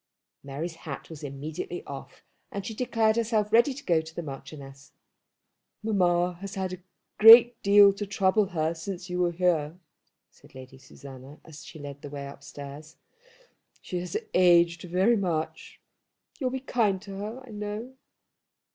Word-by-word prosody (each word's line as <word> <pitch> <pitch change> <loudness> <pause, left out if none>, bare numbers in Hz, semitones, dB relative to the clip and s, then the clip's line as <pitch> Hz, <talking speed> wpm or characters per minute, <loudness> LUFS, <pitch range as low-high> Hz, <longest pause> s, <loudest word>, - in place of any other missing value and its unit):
Mary's 155 +5 -6
hat 155 0 -8
was 160 -2 -9
immediately 150 +5 -6
off, 140 -1 -10 0.3
and 200 -1 -5
she 220 - -5
declared 225 -2 +1
herself 215 -2 0
ready 235 +5 +5
to 270 - -8
go 165 -2 +2
to 160 0 -13
the 170 - -4
Marchioness. 135 -1 -10 0.9
"Mamma 180 -4 +1
has 200 0 -7
had 190 -1 -3
a 185 - -8 0.4
great 230 +2 +9
deal 200 0 +7
to 205 +1 -5
trouble 195 +1 +2
her 160 -2 -1
since 180 +2 -7
you 180 - -2
were 175 -1 +2
here," 170 -2 0 0.5
said - - -21
Lady 130 0 -12
Susanna, 135 +2 -13
as 155 -1 -12
she - - -11
led 145 -1 -9
the 145 - -8
way 140 -1 -6
upstairs. 145 +2 -10 0.8
"She 180 - -5
has 175 -1 -3 0.2
aged 170 -2 +4
very 185 +6 +2
much. 170 -5 -3 0.6
You'll 260 -4 0
be 260 0 -4
kind 220 -7 +1
to 195 -1 -8
her, 220 +6 -6
I 245 - -13
know." 210 +4 -6
180 Hz, 155 wpm, -27 LUFS, 155-210 Hz, 0.9 s, great